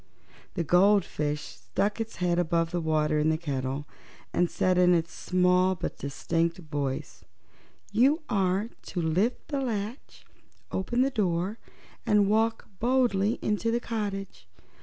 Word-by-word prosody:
The 175 - 0
goldfish 175 -4 +2
stuck 95 - -2
its 225 0 -5
head 175 -1 +1
above 165 -1 +1
the 175 -1 -1
water 155 -1 +1
in 150 +1 +2
the 160 - +2
kettle 140 -3 -3 0.5
and 175 -1 +2
said 185 -1 +1
in 180 0 +5
its 165 -1 -1
small 180 0 +2
but 175 - -5
distinct 165 +4 -1
voice: 145 -6 -4 0.7
"You 270 +10 +3
are 195 +1 0
to 180 - -5
lift 180 +9 0
the 280 -2 -1
latch, 225 0 -5 0.5
open 240 +7 +1
the 270 - +1
door, 195 -2 -1 0.4
and 210 -1 +3
walk 225 +2 +1
boldly 235 -4 +2
into 210 +2 0
the 235 +1 +1
cottage. 205 -4 -4
185 Hz, 140 wpm, -28 LUFS, 165-215 Hz, 0.7 s, in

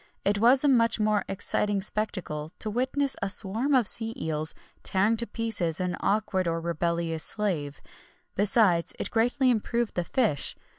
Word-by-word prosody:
It 205 +1 +1
was 250 +5 +4
a - - +3
much 230 -4 +3
more 210 -2 +1
exciting 205 +1 -1
spectacle 185 -8 -4
to 215 - -2
witness 260 +4 0
a 200 - -1
swarm 225 +9 0
of 250 -3 +3
sea 225 +2 -3
eels 155 0 -2 0.3
tearing 200 +4 +1
to 235 +1 0
pieces 205 -8 -1
an 180 -1 -2
awkward 200 -3 0
or 165 0 -1
rebellious 170 -1 -1
slave; 160 -9 0 0.5
besides, 195 -4 +4
it - - -4
greatly 245 +3 +2
improved 235 0 -1
the 175 - -1
fish. 210 - 0
205 Hz, 155 wpm, -26 LUFS, 170-230 Hz, 0.5 s, was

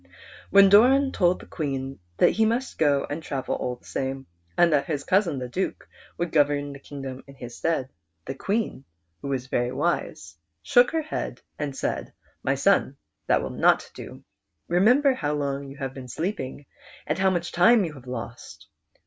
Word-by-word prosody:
When 200 0 +7
Doran 260 +7 +6
told 180 -5 +2
the - - -12
Queen 135 - -4 0.2
that - - +5
he 225 - +2
must 235 +4 -1
go 145 -3 +3
and 150 +3 -4
travel 135 -4 -3
all 125 - -2
the 125 - -25
same, 135 0 -3 0.3
and 170 -2 +5
that 140 -1 +2
his 145 -3 -2
cousin 185 -5 +2
the 125 -1 -4
Duke 185 +10 -3 0.3
would 175 -1 -2
govern 145 -1 +2
the 140 - -10
kingdom 135 -2 -8
in 140 - -13
his 120 -2 -9
stead, 160 -6 -1 0.4
the 135 - -4
Queen, 200 - -2 0.4
who - - -6
was 135 -2 -2
very 120 -1 -1
wise, 155 - -2 0.3
shook 245 0 +5
her 320 -1 -1
head 310 - -5 0.2
and 145 -3 -3
said, - - -3
" - - -36
My - - +1
son, - - +2 0.3
that - - +3
will - - -4
not - - +2
do. - - -10 0.4
Remember 245 +11 +4
how 150 -11 -2
long 140 -1 -3
you 140 - -11
have 135 -2 -4
been 130 -2 -9
sleeping, 145 - -4 0.4
and 155 +4 -2
how 190 0 +4
much 175 -2 -2
time 205 +4 +5
you 160 - -6
have 130 -3 -13
lost." 120 -1 -8
145 Hz, 185 wpm, -25 LUFS, 135-190 Hz, 0.4 s, When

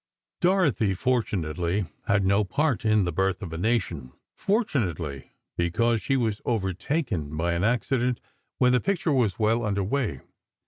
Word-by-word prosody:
Dorothy 155 - +2
fortunately 90 -5 0 0.2
had 100 -1 +2
no 100 +2 +3
part 140 +5 0
in 110 -2 +3
"The 90 - -1
Birth 95 +3 0
of 85 -3 -6
a - - -4
Nation"—fortunately, 90 - -2 0.3
because 110 +7 +1
she 135 - +1
was 110 -4 -1
overtaken 95 - -2
by 85 +2 0
an 85 +2 -1
accident 125 +2 +1 0.4
when 125 -1 +4
the 125 - +3
picture 180 -5 0
was 120 -8 +1
well 115 +2 +2
under 100 -2 0
way. 105 - -1
105 Hz, 140 wpm, -26 LUFS, 90-125 Hz, 0.4 s, when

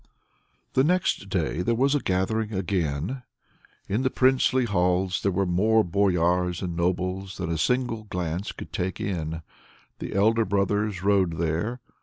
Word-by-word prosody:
The 130 - +4
next 170 - +1
day 90 -2 -1
there 115 +5 +1
was 135 +4 +2
a 145 - +2
gathering 105 +2 -1
again. 95 - -2 0.7
In 105 +5 0
the 130 - +2
princely 130 0 +3
halls 90 -2 +1
there 100 - +1
were 95 +2 +1
more 105 +5 +3
boyars 90 -1 +1
and 90 -2 -3
nobles 90 +2 -2
than 90 -3 -3
a 80 - -1
single 120 +4 0
glance 90 -1 -3
could - - -10
take 90 +1 -2
in. 80 -4 -3 0.6
The - - -5
elder 110 +3 +3
brothers 100 0 0
rode 95 -5 +2
there. 85 +10 -1
95 Hz, 150 wpm, -26 LUFS, 90-110 Hz, 0.7 s, The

